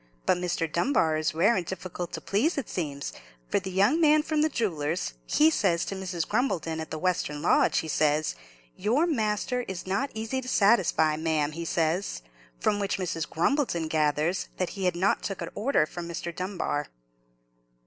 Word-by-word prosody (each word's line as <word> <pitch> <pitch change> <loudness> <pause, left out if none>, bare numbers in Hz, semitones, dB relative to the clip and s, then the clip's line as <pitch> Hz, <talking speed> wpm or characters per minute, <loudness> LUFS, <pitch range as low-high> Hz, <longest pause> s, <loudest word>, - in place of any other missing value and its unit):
But 180 - +3
Mr. 175 -2 -1
Dunbar 170 - +2
is 155 0 -1
rare 200 +8 +4
and 185 - 0
difficult 180 -1 -5
to - - -4
please, 270 - +1
it 275 - -2
seems; 145 -5 -4 0.4
for - - +2
the 190 0 -6
young 200 - +3
man 305 -1 +5
from 310 -1 0
the 310 - +3
jeweller's, 170 - -1
he 310 +1 +4
says 180 - +1
to 195 - -4
Mrs. 180 -4 -3
Grumbleton 190 - 0
at 160 - -5
the 155 - -4
western 155 -4 -1
lodge, - - +3
he 160 - 0
says, 155 0 +1 0.4
'Your 245 - +2
master 245 -4 0
is 190 -2 -5
not 195 +9 0
easy 225 +4 -2
to 255 - -9
satisfy, 190 -9 +3
ma'am,' 155 -2 0
he 165 +2 -5
says; 165 - -1 0.4
from 205 - +1
which 200 0 -1
Mrs. 170 -4 -3
Grumbleton 175 - +1
gathers 155 +3 +1
that 185 - -1
he 195 -2 -4
had 180 -1 +2
not 190 +3 +2
took 195 - -4
a - - -5
order 215 - +2
from 170 +2 -7
Mr. 170 0 -5
Dunbar." 180 -6 -2
185 Hz, 180 wpm, -27 LUFS, 160-215 Hz, 0.4 s, man